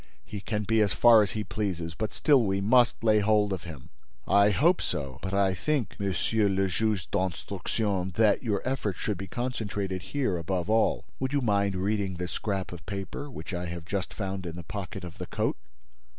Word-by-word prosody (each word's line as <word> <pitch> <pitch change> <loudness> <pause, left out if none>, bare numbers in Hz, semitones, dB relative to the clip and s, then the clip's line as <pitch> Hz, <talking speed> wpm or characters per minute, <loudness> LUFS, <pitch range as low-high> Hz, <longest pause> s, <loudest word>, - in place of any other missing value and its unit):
"He 105 -2 -6
can 105 +1 -2
be 110 +1 +2
as 100 -2 +2
far 115 -2 +7
as 100 - 0
he 110 - -2
pleases, 95 -6 -3
but 105 +4 -3
still 140 - +4
we 95 -3 +1
must 120 +4 +3
lay 110 -1 +5
hold 105 -1 +3
of 90 - -5
him." 75 -6 -9 0.4
"I 100 +1 +5
hope 165 - +3
so; 70 -3 -4
but 95 - -4
I 100 -1 +3
think, 140 +4 -1
Monsieur 100 +2 +1
le 95 0 +1
Juge 105 -2 0
d'Instruction, 95 +1 -1
that 110 -1 +4
your 110 -2 -1
efforts 120 -8 -1
should 105 -5 -2
be 95 - -5
concentrated 105 -5 -3
here 125 -5 -1
above 90 +3 -2
all. 110 0 +2
Would 130 +1 -2
you 140 - +2
mind 100 -4 +1
reading 100 0 -1
this 90 0 -4
scrap 100 -3 -2
of 90 -3 -8
paper, 100 +8 -5
which 125 - -7
I 90 0 -3
have 85 -1 -6
just 95 0 -3
found 95 -3 -4
in 85 - -6
the 85 - -7
pocket 95 +1 -6
of 85 -2 -9
the - - -5
coat?" - - -1
100 Hz, 200 wpm, -28 LUFS, 95-110 Hz, 0.4 s, far